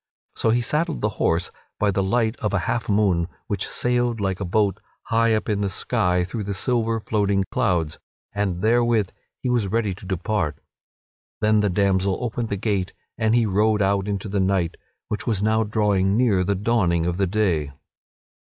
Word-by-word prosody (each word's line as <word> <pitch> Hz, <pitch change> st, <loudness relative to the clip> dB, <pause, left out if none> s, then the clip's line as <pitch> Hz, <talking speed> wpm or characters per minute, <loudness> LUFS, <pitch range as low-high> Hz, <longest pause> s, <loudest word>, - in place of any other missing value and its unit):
So 115 Hz, -, +1 dB
he 120 Hz, +2 st, +3 dB
saddled 155 Hz, +6 st, 0 dB
the 105 Hz, -, +1 dB
horse 85 Hz, +2 st, +1 dB, 0.3 s
by 105 Hz, -1 st, +2 dB
the 95 Hz, -, 0 dB
light 110 Hz, +4 st, +1 dB
of 105 Hz, -, -2 dB
a 90 Hz, -, -1 dB
half 120 Hz, -2 st, -2 dB
moon 100 Hz, -5 st, +2 dB, 0.2 s
which 100 Hz, -2 st, -2 dB
sailed 120 Hz, -1 st, 0 dB
like 95 Hz, -2 st, -1 dB
a 100 Hz, -, -2 dB
boat 100 Hz, +1 st, +1 dB, 0.2 s
high 115 Hz, 0 st, +2 dB
up 110 Hz, -, -2 dB
in 105 Hz, -2 st, 0 dB
the 100 Hz, -, 0 dB
sky 90 Hz, -1 st, +1 dB
through 105 Hz, +3 st, -4 dB
the 100 Hz, 0 st, -3 dB
silver, 115 Hz, +1 st, +1 dB
floating 100 Hz, -2 st, +1 dB
clouds, 85 Hz, -6 st, 0 dB, 0.3 s
and 100 Hz, -3 st, -2 dB
therewith 115 Hz, -2 st, +2 dB, 0.3 s
he -, -, -1 dB
was 120 Hz, -5 st, +1 dB
ready 105 Hz, -1 st, 0 dB
to 95 Hz, +1 st, -11 dB
depart. 90 Hz, -5 st, -1 dB, 0.8 s
Then 110 Hz, 0 st, +3 dB
the 105 Hz, -1 st, +2 dB
damsel 95 Hz, 0 st, +1 dB
opened 120 Hz, -1 st, -3 dB
the 100 Hz, -, -2 dB
gate 100 Hz, -3 st, -1 dB, 0.2 s
and 110 Hz, 0 st, +1 dB
he 120 Hz, -1 st, +3 dB
rode 105 Hz, +1 st, +2 dB
out 100 Hz, 0 st, +1 dB
into 100 Hz, 0 st, -3 dB
the 100 Hz, 0 st, -1 dB
night, 95 Hz, -3 st, +1 dB, 0.3 s
which 105 Hz, -, -4 dB
was 105 Hz, -4 st, 0 dB
now 110 Hz, +1 st, +2 dB
drawing 105 Hz, -2 st, +1 dB
near 110 Hz, -7 st, +3 dB
the 100 Hz, +2 st, 0 dB
dawning 95 Hz, -5 st, +1 dB
of 90 Hz, 0 st, -1 dB
the 95 Hz, -1 st, +1 dB
day. 90 Hz, -8 st, 0 dB
105 Hz, 185 wpm, -23 LUFS, 95-110 Hz, 0.8 s, he